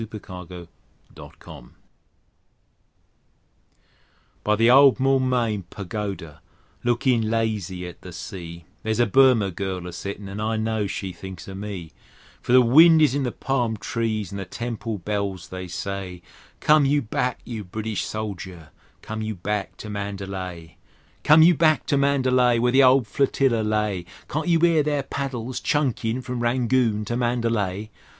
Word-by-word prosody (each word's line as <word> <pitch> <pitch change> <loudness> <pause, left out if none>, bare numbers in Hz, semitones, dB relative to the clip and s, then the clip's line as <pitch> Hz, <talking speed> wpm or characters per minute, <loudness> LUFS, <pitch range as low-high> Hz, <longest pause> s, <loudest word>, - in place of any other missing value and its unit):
Rudyard 105 -5 -8
Kipling 90 -2 -9 0.5
Mandalay - - -13 2.7
BY 105 - +2
the 115 +3 +4
old 135 0 +7
Moulmein 125 -6 +1
Pagoda, 95 -6 -6 0.4
lookin' 120 -2 +1
lazy 105 -5 -2
at 90 - -11
the 90 - -10
sea, 85 -1 -8 0.2
There's 110 +1 -2
a 120 - +5
Burma 120 -3 +4
girl 95 0 -4
a 90 - -7
settin', 100 +3 -6
and 100 +2 -6
I 110 +1 -1
know 110 -1 -1
she 95 -1 -4
thinks 95 0 -9
o' 95 - -7
me; 95 -4 -6 0.5
For - - -4
the 125 0 +7
wind 160 +7 +7
is 150 -5 +4
in 145 - 0
the 125 -2 -1
palm 120 -5 -1
trees, 110 -2 -2
and 100 - -5
the 95 - -5
temple 115 +2 -4
bells 100 -1 -3
they 95 0 -6
say: 90 -1 -5 0.4
"Come 150 -1 +5
you 145 +1 +2
back, 125 +3 -2
you 115 -3 -5
British 110 +3 -4
soldier; 95 -7 -6 0.3
come 110 0 -5
you 110 0 -3
back 100 +2 -3
to - - -9
Mandalay!" 95 -5 -6 0.5
Come 155 +1 +7
you 175 +2 +7
back 155 -1 +2
to 145 - +1
Mandalay, 130 -3 +3
Where 120 +1 +2
the 135 +2 +5
old 130 -1 +5
Flotilla 135 0 +1
lay: 105 -4 -1 0.2
Can't 155 +4 -3
you 170 -1 +3
'ear 165 -2 +5
their 145 -1 0
paddles 130 -3 -4
chunkin' 130 -4 -1
from 125 -1 -4
Rangoon 120 -2 +1
to 120 - -3
Mandalay? 115 -4 -1
110 Hz, 150 wpm, -24 LUFS, 95-125 Hz, 2.7 s, old